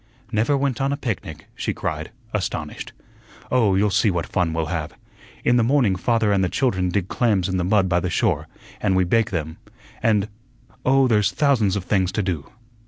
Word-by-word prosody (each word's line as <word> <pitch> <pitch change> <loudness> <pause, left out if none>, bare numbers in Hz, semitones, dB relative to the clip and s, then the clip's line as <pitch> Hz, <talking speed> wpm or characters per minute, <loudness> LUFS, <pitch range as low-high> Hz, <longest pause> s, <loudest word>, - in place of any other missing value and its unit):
"Never 115 +6 +2
went 135 -2 -1
on 135 +1 +1
a 140 - -1
picnic?" 105 - -5
she - - -3
cried, 80 +1 -3 0.2
astonished. 105 -3 -3 0.6
"Oh, 110 -7 +3
you'll 100 +1 +2
see 105 +3 +3
what 85 -3 -1
fun 90 -3 0
we'll 80 0 -1
have. 80 -2 -4 0.5
In 120 - +4
the 120 - +3
morning 120 -6 +3
father 115 +2 +1
and 100 -1 +2
the 90 - +1
children 95 -9 0
dig 90 0 -1
clams 105 -7 +1
in 95 -1 -1
the 90 - 0
mud 95 +1 +3
by 90 -1 +2
the 90 - -2
shore, 85 - 0 0.3
an' 100 -3 +2
we 95 - +3
bake 110 +5 +2
them, 80 -3 -4 0.4
and 105 -2 +2 0.6
oh, 135 0 +4
there's 105 -5 +3
thousands 120 -10 +2
of 100 - -2
things 95 -1 +1
to 110 - 0
do." 85 -6 -3
100 Hz, 195 wpm, -22 LUFS, 90-115 Hz, 0.6 s, In